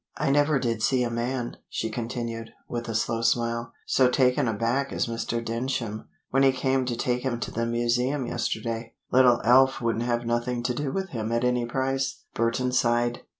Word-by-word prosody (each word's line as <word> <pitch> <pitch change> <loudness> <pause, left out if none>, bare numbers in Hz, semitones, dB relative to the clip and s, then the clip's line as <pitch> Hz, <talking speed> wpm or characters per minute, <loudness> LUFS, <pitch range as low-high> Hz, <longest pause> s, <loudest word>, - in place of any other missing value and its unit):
I - - +1
never 145 +1 +3
did 115 -4 -1
see 125 +2 +2
a 120 - -2
man," 120 +1 -2
she 110 - -3
continued, 115 0 -4
with 120 -1 -4
a 115 - -3
slow 115 +1 0
smile, 115 0 0
"so 130 -1 +4
taken 125 -1 +3
aback 115 +5 0
as - - 0
Mr. 115 0 -3
Denschem, 115 -2 -3 0.2
when 135 - +3
he 135 -1 +6
came 130 0 0
to 125 -1 -2
take 125 +1 -1
him 125 -3 -2
to - - -4
the 115 +1 -1
museum 120 +3 0
yesterday. 115 0 -3 0.2
Little 125 -2 +5
Alf 130 +3 +5
wouldn't 115 -1 -1
have 120 -1 0
nothing 120 +1 -1
to 125 - 0
do 140 +1 -2
with 190 +3 -3
him 115 -6 -3
at 115 +1 +1
any 125 -1 +1
price." 135 +1 -1
Burton 115 +2 0
sighed. 120 -1 +1
120 Hz, 190 wpm, -26 LUFS, 115-130 Hz, 0.2 s, he